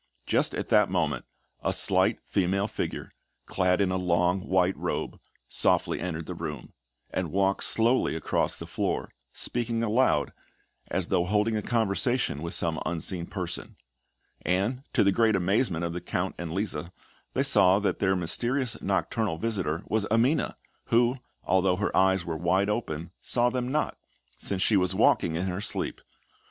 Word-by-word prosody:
Just - - +1
at - - -4
that 105 -2 +4
moment, 80 -7 -1 0.4
a - - +1
slight - - +4
female 100 +2 0
figure, - - -5 0.3
clad 90 0 +1
in 95 -2 +2
a 95 - 0
long 90 +1 +1
white 95 0 +1
robe, - - -3 0.3
softly - - +2
entered 80 -3 -4
the - - -5
room, 75 -4 -7 0.4
and 90 -4 -2
walked 95 +1 +1
slowly 115 -5 +4
across 80 - 0
the - - -6
floor, - - -2 0.2
speaking 115 -1 -2
aloud, 115 +4 +2 0.6
as 90 -1 -1
though 90 -2 +2
holding 105 +3 +1
a 105 - 0
conversation 115 - 0
with 85 +1 -2
some 80 -2 -1
unseen 85 +1 -3
person; 90 -3 -5 0.7
and 100 +8 0
to - - +3
the 100 - +4
great 110 +1 +3
amazement 95 -1 +1
of 85 - -3
the 90 - -4
Count 90 +1 -2
and 85 -2 -4
Lisa, 85 -3 -3 0.4
they - - +1
saw 95 +1 +5
that 105 0 -1
this 95 -1 +2
mysterious 120 +8 0
nocturnal 100 -1 -1
visitor 95 -4 -2
was 105 -2 0
Amina, 120 +8 +1 0.3
who, 120 +2 +2 0.3
although 95 -1 +2
her 100 +2 -2
eyes 95 -1 +3
were 85 -2 -3
wide 95 +5 +1
open, 85 -7 -4
saw 120 0 +1
them 125 0 -2
not, 155 +2 -1 0.4
since 95 -2 0
she 105 - +4
was 90 -1 +1
walking 80 - +3
in 85 +3 -1
her 95 +1 -3
sleep. 105 - -2
95 Hz, 160 wpm, -27 LUFS, 90-110 Hz, 0.7 s, saw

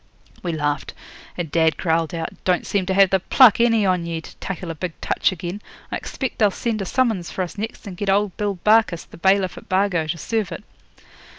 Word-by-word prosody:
We 175 - -2
laughed, 145 -2 -2 0.4
and 170 -4 -4
dad 160 0 +2
growled 165 -2 0
out 165 -1 -3
'Don't 180 -1 +1
seem 190 -3 -1
to 190 - +1
have 195 -1 +5
the 190 - +3
pluck, 235 +4 +6
any 230 -3 +4
on 180 -2 +1
ye, 165 -1 -3
to 160 - -12
tackle 185 -3 -5
a - - -4
big 165 +1 -6
touch - - +1
again. 180 +3 -6 0.3
I - - -1
expect 265 -3 -5
they'll 210 - +5
send 220 +2 -2
a - - -2
summons 220 -6 0
for 185 - -2
us 175 - -7
next, 220 +3 -6
and 195 -3 -7
get 205 +1 -2
old 200 -1 +2
Bill 205 -2 -2
Barkis, 210 -6 +4
the - - -14
bailiff 190 +1 +2
at - - -20
Bargo, 185 -4 +1
to 165 +2 -2
serve 215 +1 -2
it.' 170 - -7
185 Hz, 220 wpm, -22 LUFS, 170-205 Hz, 0.4 s, pluck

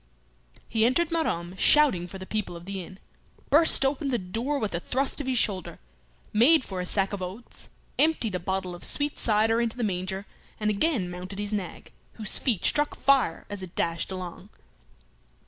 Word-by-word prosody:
He 220 -1 +1
entered 315 +8 +2
Maromme 180 - -1
shouting 270 -13 +5
for 190 - -8
the 190 - -8
people 210 -3 -3
of 170 0 -10
the 195 -1 -4
inn, 185 +2 -11 0.5
burst 305 -2 +5
open 280 +2 0
the 250 - +1
door 230 +9 -2
with 215 -8 -2
a 170 - 0
thrust 265 +9 -1
of 275 - -6
his 260 -1 +1
shoulder, 190 -6 0 0.6
made 260 +7 +6
for 190 -4 -4
a 180 - -4
sack 195 +1 0
of 200 - -4
oats, 190 +6 -7 0.3
emptied 300 -9 +3
a 180 - -1
bottle 185 +1 -2
of 175 - -9
sweet 290 0 -1
cider 225 +1 +3
into 235 +1 -1
the 245 - -1
manger, 190 0 -2 0.3
and 210 0 +1
again 215 - +1
mounted 180 +2 -7
his 205 +1 -3
nag, 195 -4 -5 0.2
whose 215 -3 -1
feet 225 - 0
struck 295 0 +2
fire 270 -12 +2
as 205 -1 -6
it 185 -2 -9
dashed 170 +2 -1
along. 180 -2 -7
210 Hz, 185 wpm, -27 LUFS, 185-260 Hz, 0.6 s, made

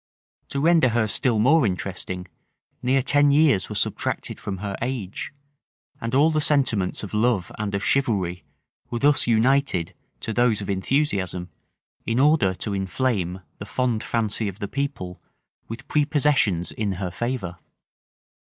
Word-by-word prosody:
To 140 - -2
render 160 -3 +4
her 115 -1 +1
still 120 +2 +3
more 140 +8 +4
interesting, 90 -2 -3 0.5
near 130 +1 +2
ten 145 +2 +4
years 140 - +3
were - - -5
subtracted - - -2
from 95 -1 -5
her 100 +1 -4
age; 115 -6 -4 0.7
and 115 +2 -2
all 150 +4 +5
the 155 -1 +1
sentiments 130 -13 +1
of 105 - -7
love 105 -4 +1
and 105 -2 -2
of 100 - -2
chivalry 95 -10 0 0.5
were 120 - -3
thus 140 +1 +3
united 115 -6 +2 0.3
to 115 - -3
those 120 -2 +2
of 100 -1 -3
enthusiasm, 95 -5 -1 0.5
in 115 +2 0
order 140 -10 +3
to 105 +2 -4
inflame 95 -2 -1 0.2
the 100 - -6
fond 125 -3 0
fancy 110 -1 -1
of 100 -1 -5
the 100 - -4
people 135 -10 -4 0.5
with 115 +4 -8
prepossessions 145 - +2
in 105 -3 -2
her 90 -1 -4
favor. 95 -4 -4
115 Hz, 145 wpm, -24 LUFS, 95-135 Hz, 0.7 s, all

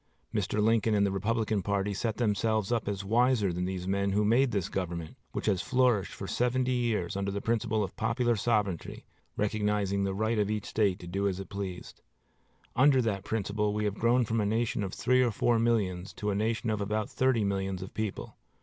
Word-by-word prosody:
Mr. 105 - -1
Lincoln 110 0 +3
and 100 -1 +3
the 100 - 0
Republican 110 +1 0
party 100 +1 -1
set 110 +2 -2
themselves 110 -2 +1
up 115 -4 0
as 100 -1 -3
wiser 115 -3 +2
than 90 +1 -2
these 90 -1 -4
men 100 0 0
who 105 +1 +2
made 125 +5 +4
this 100 -7 -1
government, 85 -4 -4 0.2
which - - -4
has 100 -4 +2
flourished 125 -6 +2
for 95 - -7
seventy 125 +4 0
years 115 -9 0
under 100 0 -1
the 100 +1 -2
principle 110 -1 0
of 95 - -6
popular 120 +1 +1
sovereignty, 105 -5 -1 0.3
recognizing 105 -2 0
the 95 -1 -1
right 110 +2 0
of 105 -1 +1
each 105 -1 -2
State 100 -4 +1
to - - -11
do 100 +3 -1
as 95 -1 -2
it 95 - -7
pleased. 95 -3 -6 0.7
Under 135 +1 +5
that 110 -5 -1
principle, 105 -1 -1
we 105 0 0
have 105 - 0
grown 120 +1 +3
from 110 0 0
a - - 0
nation 110 0 0
of 95 - -3
three 130 0 +3
or 125 - +3
four 115 +2 +2
millions 100 -6 0
to 105 0 -2
a - - -1
nation 110 +2 0
of 105 -1 -1
about 105 +1 -1
thirty 130 -4 +1
millions 95 -1 -2
of 95 - -10
people. 110 -2 -4
105 Hz, 205 wpm, -29 LUFS, 100-115 Hz, 0.7 s, Under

